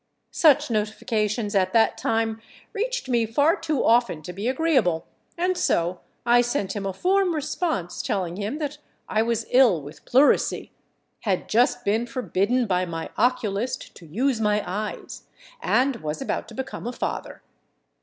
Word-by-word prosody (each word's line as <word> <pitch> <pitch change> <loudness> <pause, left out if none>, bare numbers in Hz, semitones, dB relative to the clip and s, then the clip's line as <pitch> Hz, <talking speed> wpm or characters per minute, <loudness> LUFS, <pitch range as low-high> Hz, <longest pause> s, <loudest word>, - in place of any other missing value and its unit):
Such 295 -6 +4
notifications, 215 0 -1
at 185 -2 +2
that 225 -1 +4
time, 225 0 -1 0.3
reached 470 - -2
me 235 -3 +1
far 285 +8 +3
too 315 -4 -1
often 230 -9 +3
to 180 - -7
be 200 +5 -4
agreeable, 255 - +1 0.3
and 365 +2 +1
so 175 - 0 0.3
I 240 0 +5
sent 240 -6 -2
him 200 -1 -3
a - - -1
form 370 - +1
response 300 - -2
telling 180 -4 -2
him 210 +8 -3
that 295 -1 -4 0.3
I 215 - +1
was 230 0 0
ill 245 -9 +5
with 145 +1 -12
pleurisy, 270 +4 +3 0.5
had 195 -4 -1
just 245 +2 +2
been 220 +4 +1
forbidden 240 0 0
by 185 -3 +1
my 165 -2 -5
oculist 235 -1 -1
to 170 - -14
use 235 - 0
my 210 -1 +2
eyes, 205 +4 -5 0.3
and 255 +3 +2
was 155 -6 -4
about 270 - -3
to - - -12
become 265 -2 -5
a 245 - -3
father. - - -5
225 Hz, 155 wpm, -24 LUFS, 200-265 Hz, 0.5 s, I